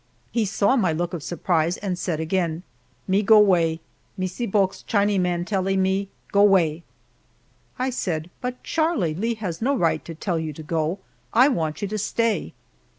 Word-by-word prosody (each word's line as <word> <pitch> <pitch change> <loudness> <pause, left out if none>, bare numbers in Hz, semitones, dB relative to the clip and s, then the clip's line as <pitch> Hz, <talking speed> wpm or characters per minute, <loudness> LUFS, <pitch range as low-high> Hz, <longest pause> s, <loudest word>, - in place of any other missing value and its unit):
He 230 -2 +1
saw 205 +4 +2
my 190 -10 +2
look 175 +3 -2
of 170 - -4
surprise 170 +1 0
and 195 -3 -3
said 175 -3 -2
again, 165 0 -1 0.4
"Me 195 +2 +3
go 215 +1 +6
'way 170 -5 +3 0.4
Missee 185 +6 -3
Bulk's 195 -1 +1
Chinee 205 -2 +1
man 175 -1 0
tellee 195 -1 0
me 190 +1 +1 0.2
go 200 - +4
'way." 175 -6 +4 1.0
I 260 +1 -1
said, 175 -8 -3
"But, 250 0 -5
Charlie, 315 - 0
Lee 225 +8 -1
has 185 -7 -5
no 275 +4 +1
right 170 -6 +1
to 165 - -7
tell 170 +1 -2
you 160 -1 -4
to 155 - -9
go; 160 +3 -1 0.4
I 255 +5 +7
want 160 - -2
you - - 0
to 215 +2 -3
stay." 230 +2 0
190 Hz, 175 wpm, -24 LUFS, 165-210 Hz, 1.0 s, I